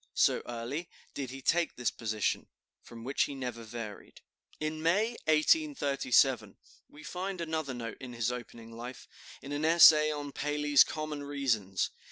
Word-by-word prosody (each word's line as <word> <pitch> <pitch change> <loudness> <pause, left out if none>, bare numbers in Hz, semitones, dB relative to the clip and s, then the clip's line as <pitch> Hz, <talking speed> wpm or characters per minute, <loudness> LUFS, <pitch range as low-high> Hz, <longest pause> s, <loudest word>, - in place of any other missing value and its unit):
So - - +3
early 120 +8 -5 0.2
did 135 -3 -4
he 135 +1 -9
take 170 +3 +1
this 125 - -1
position, 110 -2 -2 0.3
from 115 -1 -12
which 135 +4 +1
he 140 - -6
never 125 -3 -5
varied. 110 -2 -8 0.4
In 155 0 -3
May, 190 +8 +2 0.2
1837, 140 - +2 0.3
we 150 +1 -14
find 185 +4 -4
another 160 -5 -3
note 115 -2 -7
of 130 -2 -7
his 120 0 -1
opening 120 -2 -8
life, 120 +2 -8 0.4
in 140 - -8
an 145 +1 -2
essay 155 -2 +7
on 145 -1 -5
Paley's 150 0 +3
"Common 155 -2 -5
Reasons." 125 -10 -1
140 Hz, 150 wpm, -31 LUFS, 120-155 Hz, 0.4 s, essay